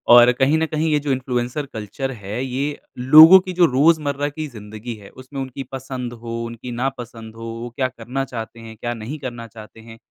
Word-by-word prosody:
और 120 0 +8
कहीं 135 +5 +2
न 160 - +1
कहीं 155 +1 -1
ये 150 - +3
जो 145 -1 -2
इन्फ्लुएंसर 125 +2 -2
कल्चर 110 +5 -4
है 105 +1 -5
ये 135 +3 -3 0.2
लोगों 155 +9 +9
की 185 0 -6
जो 175 -1 +5
रोज़मर्रा 145 0 +2
की 155 +1 -5
ज़िंदगी 110 -1 -8
है 100 -2 -13
उसमें 130 +2 -10
उनकी 135 +1 -6
पसंद 130 -2 -5
हो, 115 0 -5
उनकी 115 +1 -7
ना 125 +3 0
पसंद 115 -2 -9
हो, 115 - -10 0.2
वो 120 - -5
क्या 130 +1 -1
करना 125 +2 -4
चाहते 115 -2 -7
हैं? 115 -1 -10
क्या 120 +2 -3
नहीं 120 +7 -7
करना 120 -3 -6
चाहते 110 0 -13
हैं? 115 0 -13
125 Hz, 210 wpm, -21 LUFS, 115-140 Hz, 0.2 s, लोगों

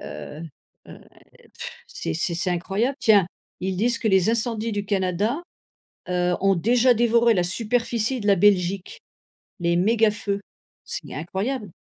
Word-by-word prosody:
heu 145 - -8 0.4
heu, - - -11 0.6
pff, - - -6 0.2
c'est 80 - -4
c'est 170 - -1
c'est 180 +2 0
incroyable. 195 +9 -1
Tiens, 215 -6 +5 0.4
ils 190 0 -2
disent 235 +4 +1
que 230 - -2
les 190 0 +3
incendies 230 -1 -1
du 205 -1 -3
Canada, 200 - 0 0.7
heu, 180 0 +1
ont 195 0 +3
déjà 240 +7 +3
dévoré 235 0 +3
la 180 - +2
superficie 230 +5 -1
de 205 - -2
la 200 - +5
Belgique. 190 -1 +1 0.6
Les 170 0 +1
mégafeux. 210 0 +1 0.5
C'est - - -5
incroyable 195 - -3
205 Hz, 140 wpm, -23 LUFS, 180-230 Hz, 0.7 s, Tiens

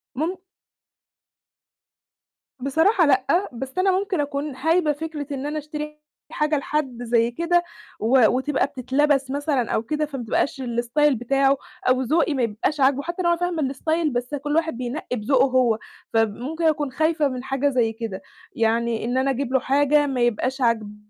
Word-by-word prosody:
مُم 325 +8 -2 2.2
بصراحة 320 - +3
لأ، 280 +7 +2
بس 265 +6 -7
أنا 380 +1 +3
ممكن 390 -4 -2
أكون 285 -1 -3
هايبة 320 +3 +2
فكرة 300 -1 -5
إن 275 0 -4
أنا 300 +1 -3
أشتري 300 0 -7 0.3
حاجة 300 0 +1
لحد 275 -4 -2
زي 235 0 +2
كده 340 +6 +1 0.4
و 235 +1 +5
وتبقى 265 +3 +1
بتتلبس 270 +1 0
مثلًا 285 -4 -1
أو 220 - 0
كده، 305 +5 -1
فما 275 -4 -6
تبقاش 265 +4 -1
الstyle 245 +4 +1
بتاعه 270 +3 +2 0.3
أو 255 0 +3
ذوقي 310 +5 +1
ما 260 -3 0
يبقاش 230 +7 -1
عاجبه، 275 +1 +3
حتى 345 +3 -4
لو 345 - +3
أنا 340 - +2
فاهمة 330 -6 -1
الstyle 315 +2 0
بس 245 +3 -2
كل 290 +1 -2
واحد 320 -6 0
بينقّي 250 +1 -4
بذوقه 255 +4 +3
هو، 250 -4 +2 0.3
فب 225 -2 +2
مُمكن 305 +9 -5
أكون 295 -3 +1
خايفة 315 +2 +1
من 255 -2 -5
حاجة 270 +1 0
زي 240 -4 +1
كده. 225 -4 -6 0.3
يعني 230 0 0
إن 245 +2 -1
أنا 270 +1 +2
أجيب 265 0 -3
له 265 - +4
حاجة 290 +3 +3
ما 260 -3 -1
يبقاش 245 +3 0
عاجباه 220 -4 0
275 Hz, 170 wpm, -23 LUFS, 245-300 Hz, 2.2 s, و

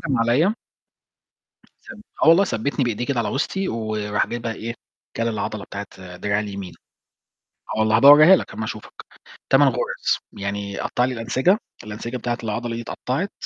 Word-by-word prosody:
هجم 135 -7 -1
عليَّ 135 - +3 1.3
ثَّب 225 - -10 0.2
آه - - +5
والله، 170 +4 +7
ثَّبتني 140 - -1
بإيديه 120 0 -2
كده 140 -4 -1
على - - -2
وسطي، 190 +7 -1
وراح 110 -2 -1
جايب 120 0 -5
بقى 115 -1 -3
إيه، 115 +1 -5 0.4
كل 115 0 0
العضّلة 105 -1 -3
بتاعة 95 -3 -9
دراعي 100 +2 0
اليمين 100 -3 -6 1.0
آه - - -3
والله، 110 0 +3
هبقى 135 +5 +8
أوريها 155 +6 +9
لَك - - -5
أمّا 110 - -4
أشوفك. 110 0 -7 0.6
تمن 140 +1 +6
غُرز، 125 -1 -1
يعني 100 0 -4
قطّع 125 - 0
لي 130 - -1
الأنسجة، 130 - +1 0.3
الأنسجة 110 +4 -6
بتاعة 120 0 -2
العضّلة 115 +2 -3
دي 120 - -4
اتقطّعت، 135 - -3
115 Hz, 165 wpm, -22 LUFS, 105-135 Hz, 1.3 s, أوريها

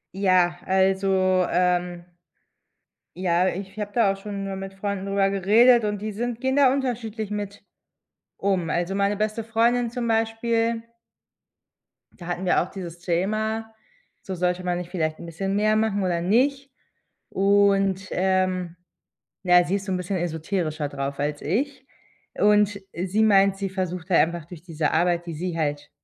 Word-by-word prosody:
Ja, 185 -3 +2
also, 190 -1 +2
ähm 180 -1 0 1.1
Ja, 180 0 +1
ich 195 +3 -5
habe 205 -1 -4
da 215 -4 +3
auch - - -10
schon 200 0 -6
mal 195 0 -4
mit 195 0 -7
Freunden 195 0 -4
drüber 195 0 +1
geredet, 220 +5 +5
und 205 -1 -2
die 215 0 -3
sind 235 +2 -3
gehen 265 0 0
da 270 -2 +5
unterschiedlich 230 -5 -3
mit 205 -1 -5 0.8
um. 190 -5 0
Also, 175 +4 -1
meine 200 +1 +1
beste 215 +1 -1
Freundin 235 +1 +1
zum 240 -1 -3
Beispiel 225 0 0 1.3
da 175 - -11
hatten 175 +1 -3
wir 180 - +3
auch 180 - -4
dieses 175 -3 -8
Thema, 215 +6 -2 0.5
so 190 - -6
sollte 180 +1 -1
man 180 -1 -1
nicht 175 -1 -6
vielleicht 155 -4 -2
'n 170 - -8
bisschen 195 +4 -3
mehr 215 +1 +2
machen 215 -2 +1
oder 175 -2 0
nicht. 270 +8 +1 0.6
Und, 195 -1 +2
ähm, 185 -2 0 0.7
ja, 180 -1 +6
sie 180 +3 0
ist 200 0 -6
so 190 - -2
'n 185 - +1
bisschen 180 +1 -3
esoterischer 160 -2 -2
drauf 140 0 -4
als 145 0 -2
ich. 260 - -2 0.5
Und 205 -1 +3
sie 190 +5 0
meint, 195 -2 +4
sie 195 -1 -3
versucht 185 -2 -4
halt 175 - +5
einfach 170 0 0
durch 170 -2 -11
diese 160 -4 -2
Arbeit, 175 +1 +1
die 170 - -5
sie 175 +1 -4
halt 145 -2 -2
195 Hz, 160 wpm, -24 LUFS, 175-215 Hz, 1.3 s, ja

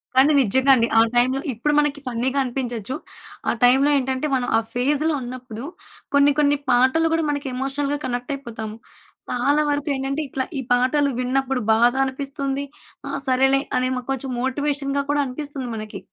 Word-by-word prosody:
కానీ 270 +4 +6
నిజంగా 265 +4 +3
అండి. 235 -2 +2
ఆ - - +8
టైమ్‌లో 255 +3 +2
ఇప్పుడు 295 +7 0
మనకి 295 -1 0
ఫన్నీగా 250 +3 -1
అనిపించొచ్చు. 245 -2 -4 0.5
ఆ - - +4
టైమ్‌లో 265 +4 +5
ఏంటంటే 265 +2 -1
మనం 245 -1 -1
ఆ - - +4
ఫేజ్‌లో 290 +5 +1
ఉన్నప్పుడు 245 -2 -7 0.5
కొన్ని 280 0 +6
కొన్ని 290 -1 +3
పాటలు 260 +7 +3
కూడా 325 -1 +1
మన 285 -1 -2
ఎమోషనల్‌గా 275 +2 -2
కనెక్ట్ 245 +1 -3
అయిపోతాము. 225 -5 -7 0.5
చాలా 285 +5 +2
వరకు 290 +1 -1
ఏంటంటే 270 +3 -2
ఇట్లా 265 0 -2 0.2
ఈ - - -1
పాటలు 275 +3 +2
విన్నప్పుడు 260 0 0
బాధనిపిస్తుంది. 270 +3 0 0.5
ఆ - - -3 0.2
సరేలే 270 +1 +3 0.2
అని 255 0 +1 0.2
కొంచెం 270 0 -3
మోటివేషన్‍గా 280 +1 -1
కూడా 290 0 +2
అనిపిస్తుంది 275 0 -5
మనకి. 215 -1 -6
265 Hz, 150 wpm, -22 LUFS, 250-285 Hz, 0.5 s, ఆ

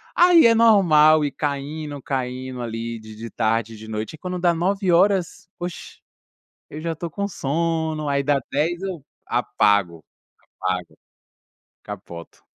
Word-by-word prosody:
Aí 345 -4 +7
é 230 - +4
normal 155 -9 +5
ir 145 - -2
caindo, 145 0 -4
caindo 130 -1 -4
ali 115 0 -4
de 110 0 -11
de 115 +1 -7
tarde 115 0 -1
e - - -12
de 110 +1 -11
noite. 110 +7 -4
Aí - - -19
quando 180 +1 -4
dá 175 -1 +3
21h,, 185 0 +1
oxe, 175 0 -7 0.7
eu 155 - -7
já 165 -1 -2
tô 165 +1 -6
com 200 +4 -3
um - - -1
sono, 160 -1 -1
aí 140 0 +1
dá 140 0 +2
22h 170 +5 0
eu 185 -7 -5 0.2
apago, 100 -8 +1 0.6
apago. 90 -2 -3 0.9
Capoto. 90 -5 -10
150 Hz, 150 wpm, -22 LUFS, 115-175 Hz, 0.9 s, Aí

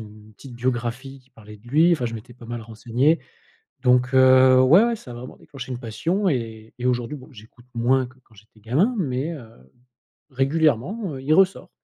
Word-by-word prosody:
une 105 0 -13
petite 130 +1 -12
biographie 125 +2 -3
qui 130 +1 -31
parlait 105 -3 -14
de 110 - -23
lui. 160 +6 +4
Enfin 130 -8 0
je 115 - -5
m'étais 115 +3 -10
pas 120 -2 -14
mal 120 -1 -6
renseigné. 120 +8 0 0.6
Donc 125 0 +3
heu, 130 0 +6
ouais, 160 - +6
ouais, 235 -1 0
ça 125 - -12
a - - -8
vraiment 125 +2 -10
déclenché 135 -3 -10
une 120 - -5
passion 170 - -1
et 115 -5 -4
et 125 - -3
aujourd'hui 125 +2 -1
bon, 130 0 -13
j'écoute 115 +1 -17
moins 125 +2 +1
que 130 +1 -18
quand 110 - -25
j'étais 110 +2 -21
gamin 140 - +1
mais 140 -1 -2
heu, 135 -9 -10 0.8
régulièrement, 155 - 0
heu, 130 - -8
il 150 +3 +2
ressort. 195 +2 +2
125 Hz, 200 wpm, -23 LUFS, 115-145 Hz, 0.8 s, heu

